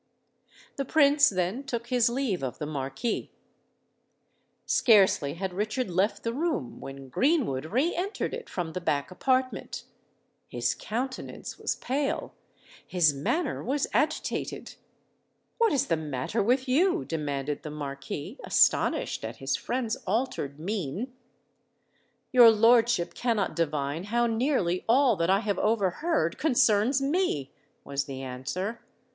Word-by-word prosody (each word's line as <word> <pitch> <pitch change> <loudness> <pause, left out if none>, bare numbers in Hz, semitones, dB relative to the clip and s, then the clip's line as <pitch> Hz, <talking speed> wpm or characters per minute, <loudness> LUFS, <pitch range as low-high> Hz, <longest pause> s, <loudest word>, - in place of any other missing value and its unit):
The 275 - -1
Prince 285 0 +5
then 185 +7 -2
took 235 -4 -4
his 245 -2 +3
leave 240 -7 -1
of 130 -2 -4
the 150 - -4
Marquis. 140 - -3 1.4
Scarcely 190 - +4
had 190 +1 -4
Richard 215 +3 -2
left 190 +5 0
the 230 - -1
room, 285 - -2
when 135 0 -9
Greenwood 245 - +1
re 260 - +1
entered 385 +5 -3
it 475 0 -6
from 170 -3 -4
the 180 - -4
back 145 -1 -1
apartment. 255 +1 -1 0.7
His 120 -1 0
countenance 255 +4 -5
was - - -1
pale—his 220 - -2
manner 275 - -1
was 275 +3 0
agitated. 310 +1 -1 0.9
"What 460 -1 +4
is 280 -4 +2
the 165 - +1
matter 150 - -2
with 255 +6 +1
you?" 355 +7 +2
demanded 145 -2 -3
the 155 - -7
Marquis, 145 - -6
astonished - - +2
at - - -5
his - - -2
friend's 240 -3 -2
altered 190 - -2
mien. 195 - -3 1.2
"Your 245 -2 +9
lordship 230 -3 +4
cannot 230 -5 -1
divine 150 0 -1
how 240 +3 +1
nearly 225 -7 0
all 255 -1 +5
that 165 +1 0
I 195 +2 +4
have 205 -3 -1
overheard 210 - 0
concerns 255 -2 +3
me," 275 - 0 0.3
was 140 0 -2
the 135 -2 -7
answer. 140 - -4
210 Hz, 130 wpm, -28 LUFS, 155-260 Hz, 1.4 s, Your